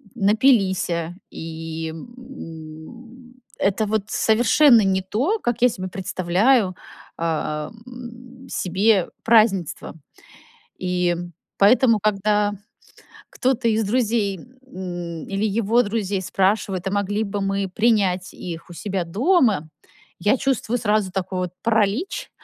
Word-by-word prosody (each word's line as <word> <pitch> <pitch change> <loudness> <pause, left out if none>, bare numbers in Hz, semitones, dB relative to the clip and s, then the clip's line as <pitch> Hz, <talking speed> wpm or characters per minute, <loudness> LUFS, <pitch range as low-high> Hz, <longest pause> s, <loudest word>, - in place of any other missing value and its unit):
напилися. 195 -6 +2 0.2
И, 160 0 -6
м, 235 - -11 0.2
это 205 +2 +1
вот 215 -1 0
совершенно 235 +2 +5
не 190 -1 +1
то, 265 - -1
как 240 - -1
я 250 - +7
себе 185 -4 -5
представляю, 190 +3 +1 0.4
а, 155 -1 -2 0.2
м, 245 +1 -11
себе 190 +1 +1
празднество. 215 -11 +2 0.8
И 180 -1 0 0.4
поэтому, 225 +2 +5
когда 210 0 +1 0.8
кто-то 250 -2 0
из 220 0 +2
друзей, 215 -3 0
м, 180 -9 -8
или 200 +2 -1
его 230 +2 +3
друзей 205 -3 -2
спрашивает, 195 0 0
а - - -1
могли 205 +1 0
бы 200 -1 -3
мы 195 0 -1
принять 190 -3 +1
их 170 0 -8
у - - -9
себя 185 +2 -3
дома, 220 - +2 0.5
я 205 +9 +2
чувствую 245 -3 0
сразу 210 -4 0
такой 185 -1 -3
вот 180 -1 -3
паралич. 230 - 0
205 Hz, 110 wpm, -22 LUFS, 185-235 Hz, 0.8 s, я